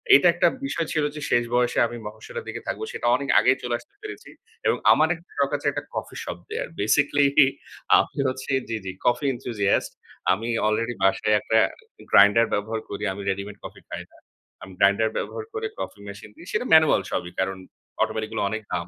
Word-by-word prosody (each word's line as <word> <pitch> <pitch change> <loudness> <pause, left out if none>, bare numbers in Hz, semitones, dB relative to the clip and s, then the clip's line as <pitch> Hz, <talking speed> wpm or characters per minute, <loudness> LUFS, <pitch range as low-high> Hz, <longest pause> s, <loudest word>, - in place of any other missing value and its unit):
এটা 140 +5 +6
একটা 175 - +3 0.2
বিষয় 165 - -2
ছিল 155 -2 +1
যে 150 - -6
শেষ। 120 - +3
বয়সে 125 0 +2
আমি 120 - -7
মফস্বলের 110 +1 -8
দিকে - - -5
থাকবো - - -3
সেটা 120 - -3
অনেক 140 +1 -4
আগেই 130 - +3
চলে 120 -1 -1
আসতে - - -21
পেরেছি। 420 +2 -8 0.4
এবং - - +3
আমার 155 +1 +5
একটা 170 +2 -19
শখ 140 -1 +2
আছে 145 - -4
একটা - - -4
কফি - - -5
শপ - - -5
দেয়ার। - - -3
বেসিক্যালি 145 +7 +3 0.7
আমি - - -2
হচ্ছি 130 +1 -4 0.2
জি, 115 - -1
জি 95 - -3
কফি 125 +3 +2
enthusiast. 110 -5 -1 0.4
আমি 115 +5 -4 0.2
আলরেডি 115 +3 0
বাসায় 105 +2 +3
একটা 110 - +1 0.5
গ্রাইন্ডার 115 +3 +7
ব্যবহার 110 +2 -1
করি। 100 +1 -5
আমি 100 - -7
রেডিমেড 100 +1 -4
কফি - - -10
খাই - - -5
না। - - -21 0.4
আমি 95 - -10
গ্রাইন্ডার 100 +3 +4
ব্যবহার 440 - -4
করে 445 0 -2
কফি 100 - -6
মেশিনে 100 +1 -10
দিই। 170 - -13
সেটা 230 +4 -1
ম্যানুয়াল 160 -1 +6
সবই 90 0 -3
কারণ 95 0 -1 0.4
অটোমেটিক 110 0 -1
গুলো 110 - -2
অনেক 110 0 -3
দাম। 90 0 -2
115 Hz, 190 wpm, -24 LUFS, 105-145 Hz, 0.7 s, গ্রাইন্ডার